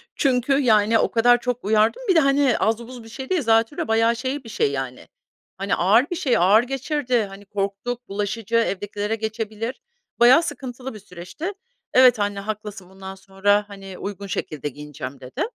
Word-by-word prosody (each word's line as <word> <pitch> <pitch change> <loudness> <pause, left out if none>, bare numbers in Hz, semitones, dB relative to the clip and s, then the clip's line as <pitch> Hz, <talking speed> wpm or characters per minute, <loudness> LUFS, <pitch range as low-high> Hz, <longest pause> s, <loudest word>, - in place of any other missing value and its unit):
Çünkü, 260 0 +1
yani, 220 -3 +4
o - - +1
kadar 245 +1 +4
çok 250 -1 -3
uyardım 215 - +2
bir 375 - +3
de. - - +7
Hani, 275 -3 +3
az 220 +1 +1
buz 250 -2 -10
bir 225 - -13
şey 265 +3 -8
değil. 365 -4 +1
Zatürre, 225 +3 +1
bayağı 225 +1 +3
şey 260 +3 -4
bir 225 - -11
şey, 140 -9 0
yani, 135 -2 -5 0.5
hani, 195 +1 0
ağır 215 - +3
bir 355 - -2
şey. 285 -8 +1
Ağır 200 +7 +5
geçirdi, 260 -3 -1
hani, 195 +1 -12
korktuk. 200 +5 -4
Bulaşıcı, 210 +3 -3
evdekilere 205 -1 -1
geçebilir. 220 +2 -4 0.4
Bayağı 255 +8 +7
sıkıntılı 255 -3 -6
bir 215 - -10
süreçti. 190 - -7 0.4
"Evet 255 -4 +6
anne, 205 -1 -1
haklısın. 210 -2 -6
Bundan 190 0 -9
sonra, 200 +2 +1
hani, 195 -2 -10
uygun 200 0 -6
şekilde 150 -5 -4
giyineceğim." 140 -2 -8
dedi 130 0 -4
220 Hz, 175 wpm, -22 LUFS, 200-250 Hz, 0.5 s, de